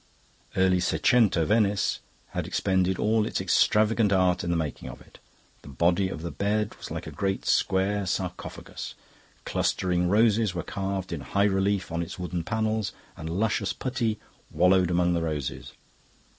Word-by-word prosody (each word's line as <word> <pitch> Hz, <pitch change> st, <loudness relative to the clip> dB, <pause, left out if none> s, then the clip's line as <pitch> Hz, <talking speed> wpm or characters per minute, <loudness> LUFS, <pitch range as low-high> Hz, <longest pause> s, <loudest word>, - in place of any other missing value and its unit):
Early 95 Hz, -1 st, +3 dB
seicento 100 Hz, -2 st, +3 dB
Venice 105 Hz, -1 st, +2 dB, 0.3 s
had -, -, -4 dB
expended 95 Hz, -1 st, +1 dB
all 110 Hz, 0 st, +2 dB
its -, -, -2 dB
extravagant 110 Hz, 0 st, +3 dB
art 90 Hz, -2 st, +2 dB
in 85 Hz, -, -3 dB
the 85 Hz, -, +1 dB
making 80 Hz, -4 st, -4 dB
of -, -, -10 dB
it. -, -, -18 dB, 0.4 s
The -, -, -15 dB
body 85 Hz, +7 st, +1 dB
of 80 Hz, -3 st, -6 dB
the 85 Hz, -, -4 dB
bed 105 Hz, +1 st, -1 dB
was -, -, -8 dB
like -, -, -5 dB
a -, -, -7 dB
great 95 Hz, -1 st, -2 dB
square 95 Hz, +1 st, +1 dB
sarcophagus. 90 Hz, -1 st, -5 dB, 0.5 s
Clustering 90 Hz, -1 st, 0 dB
roses 110 Hz, -1 st, +3 dB
were 85 Hz, -, -2 dB
carved 95 Hz, -1 st, -3 dB
in -, -, -4 dB
high 100 Hz, -, 0 dB
relief 100 Hz, -1 st, +1 dB
on 85 Hz, +1 st, -1 dB
its 85 Hz, -, -6 dB
wooden 90 Hz, -1 st, -3 dB
panels, 110 Hz, +2 st, -1 dB, 0.2 s
and 80 Hz, 0 st, -6 dB
luscious 105 Hz, +6 st, 0 dB
putti 120 Hz, -4 st, -2 dB, 0.3 s
wallowed 90 Hz, +2 st, +4 dB
among 90 Hz, 0 st, +2 dB
the 85 Hz, -, 0 dB
roses. 75 Hz, -5 st, -4 dB
95 Hz, 155 wpm, -27 LUFS, 90-105 Hz, 0.5 s, wallowed